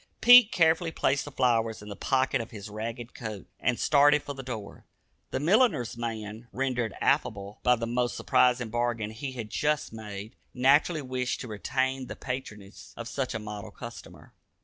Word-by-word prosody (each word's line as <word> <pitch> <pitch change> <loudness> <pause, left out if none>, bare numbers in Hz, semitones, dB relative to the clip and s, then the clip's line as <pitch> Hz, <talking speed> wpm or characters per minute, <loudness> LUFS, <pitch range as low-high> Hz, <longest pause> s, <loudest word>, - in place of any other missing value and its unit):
Pete 245 -2 +9
carefully 165 0 +3
placed 140 -2 0
the 145 - -8
flowers 115 -5 +1
in - - -11
the 100 - -6
pocket 130 +3 +1
of 115 - -8
his 105 -2 -9
ragged 115 +3 -6
coat, 110 -4 -7
and 125 -1 0
started 145 0 +4
for 145 - -5
the 135 - -7
door. 115 -6 -8 0.4
The - - -2
milliner's 175 - +2
man, 115 -1 -5
rendered 125 -4 -1
affable 100 +1 0
by 125 0 +4
the 115 -1 -3
most 120 +1 -1
surprising 125 -2 +2
bargain 120 -2 -1
he 130 +4 -6
had 115 -4 -6
just 150 -4 0
made, 105 0 -8 0.2
naturally 145 +5 +3
wished 130 -1 -2
to - - -6
retain 130 +5 -2
the - - -6
patronage 105 -6 -7
of 115 - -6
such 130 -2 -3
a - - -2
model 105 -1 -7
customer. - - -11
125 Hz, 170 wpm, -28 LUFS, 110-135 Hz, 0.4 s, Pete